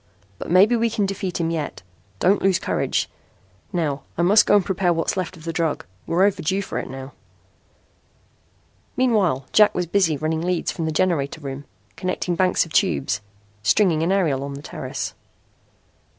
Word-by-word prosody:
But - - -6
maybe 195 +7 +5
we 230 0 +2
can 215 -2 0
defeat 190 -2 -3
him 165 -1 0
yet. 155 - -4 0.3
Don't 190 - +3
lose 190 -2 +3
courage. - - -1 0.6
Now 150 -6 -1 0.2
I 170 - +2
must 205 +5 +5
go - - +5
and 200 -3 +3
prepare 185 -2 +1
what's 165 -1 0
left 185 -2 -3
of 160 - -14
the 165 0 -4
drug. 160 -2 -1 0.2
We're 175 +3 +2
overdue 190 -1 +1
for - - -4
it - - -6
now." 135 +1 -8 1.8
Meanwhile 205 - +2
Jack 210 -1 +5
was 180 - 0
busy 170 -3 +2
running 160 +2 -1
leads 175 0 -1
from 165 - -4
the 160 - -1
generator 155 -3 0
room, 140 0 -6 0.3
connecting 185 0 -2
banks 185 -1 +2
of 165 - -13
tubes, 180 - +1 0.4
stringing 165 - +3
an 170 +3 +1
aerial 160 -9 +1
on 140 0 -5
the 140 - -9
terrace. - - -5
175 Hz, 170 wpm, -22 LUFS, 155-195 Hz, 1.8 s, maybe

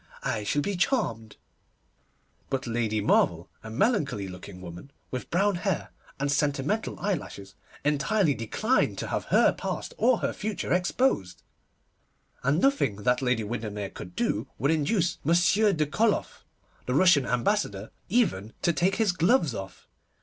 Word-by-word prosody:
I 105 - -1
shall 145 +8 0
be 205 - -2
charmed'; 145 - -1 1.1
but 135 0 -2
Lady 115 -3 -1
Marvel, 85 -3 +2
a 110 - -8
melancholy 140 - 0
looking 90 0 -10
woman, 90 +7 -10 0.2
with 130 - -5
brown 195 +2 +2
hair 185 -1 -2 0.3
and 140 +1 0
sentimental 145 +9 0
eyelashes, 145 - -4 0.3
entirely 150 +4 +2
declined 135 - 0
to - - -4
have - - -2
her - - +4
past - - -5
or 245 +1 +4
her - - -1
future 210 -4 -3
exposed; 180 - 0 1.0
and 140 +5 +2
nothing 270 - +2
that 125 +1 +2
Lady 125 -3 +1
Windermere 105 -3 -4
could 90 0 -10
do - - -1
would 140 +6 +1
induce 165 +3 +1
Monsieur 175 +7 +4
de 155 -4 +1
Koloff, 210 +9 0 0.4
the 125 - 0
Russian 155 -5 +5
Ambassador, 120 - 0 0.2
even 145 - +1
to 170 - +3
take 185 +4 +1
his 220 -4 +2
gloves 170 - +2
off. 95 -3 -8
145 Hz, 140 wpm, -27 LUFS, -, 1.1 s, Russian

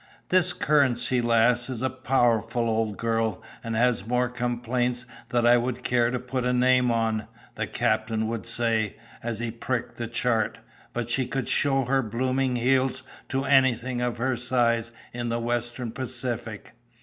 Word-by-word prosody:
"This 185 -1 +4
Currency 130 -7 +2
Lass 120 +1 +3
is 125 -1 -4
a 130 - +2
powerful 120 -2 +1
old 110 -2 0
girl, 115 -1 -1 0.2
and 115 -1 -3
has 115 -3 +2
more 125 +1 +1
complaints 125 0 -1 0.2
than 120 0 +1
I 120 +1 +7
would 125 +1 -2
care 120 -1 +2
to 125 - -1
put 125 +1 -3
a 125 - +1
name 125 0 +3
on," 115 -2 0 0.3
the - - -3
captain 110 0 0
would 115 0 -4
say, 115 -3 0 0.3
as 115 -1 -3
he 120 -1 -2
pricked 120 +1 -3
the 120 - -3
chart; 115 -1 0 0.3
"but 120 0 -3
she 130 -1 +1
could 135 -2 -3
show 135 -2 +2
her 135 +2 +2
blooming 130 +3 0
heels 130 +1 +1 0.3
to 135 +1 -1
anything 130 -2 +3
of 120 -1 -1
her 130 +2 0
size 120 -2 +1 0.2
in 120 0 -3
the 115 - 0
Western 120 0 -2
Pacific." 120 -4 -5
120 Hz, 160 wpm, -26 LUFS, 115-130 Hz, 0.3 s, I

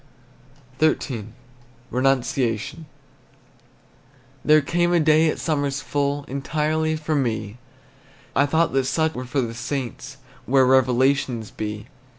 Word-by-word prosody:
XIII. 130 -8 0 0.6
RENUNCIATION. 130 +2 0 1.6
There 155 0 +5
came 175 +4 +1
a 175 - +4
day 155 0 +4
at - - -2
summer's 145 -3 -1
full 145 0 -1
Entirely 155 +3 -1
for 155 0 -3
me; 115 -5 -2 0.8
I 140 +1 +4
thought 160 +1 +1
that 135 -1 +2
such 160 +3 0
were 125 -1 -5
for 135 +2 -1
the 115 -2 -3
saints, 130 +2 -5 0.3
Where 135 0 +4
revelations 130 -2 +2
be. 105 -1 -5
135 Hz, 115 wpm, -23 LUFS, 125-155 Hz, 1.6 s, There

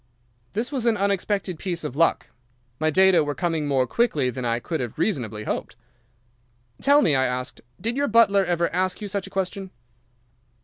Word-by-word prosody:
"This 230 +6 -2
was 255 -4 -1
an 225 -2 +3
unexpected 200 -2 -1
piece 175 -3 -3
of 150 -4 -5
luck. 165 +2 +2 0.5
My 155 0 +2
data 190 0 +5
were 145 -1 -3
coming 165 -4 -1
more 135 -2 +2
quickly 145 - +1
than 125 +1 -6
I 115 0 +1
could 160 +6 -4
have 120 -3 -5
reasonably 115 - -2
hoped. 110 +1 -4 1.1
"'Tell 285 +1 +5
me,' 155 - +3
I 130 0 +2
asked, 125 0 -4 0.2
'did 230 +2 -2
your 285 0 +1
butler 205 -3 +4
ever 170 -2 +1
ask 185 +1 0
you 210 - -5
such 200 -1 -3
a - - -10
question? 195 0 -3
180 Hz, 180 wpm, -24 LUFS, 145-200 Hz, 1.1 s, data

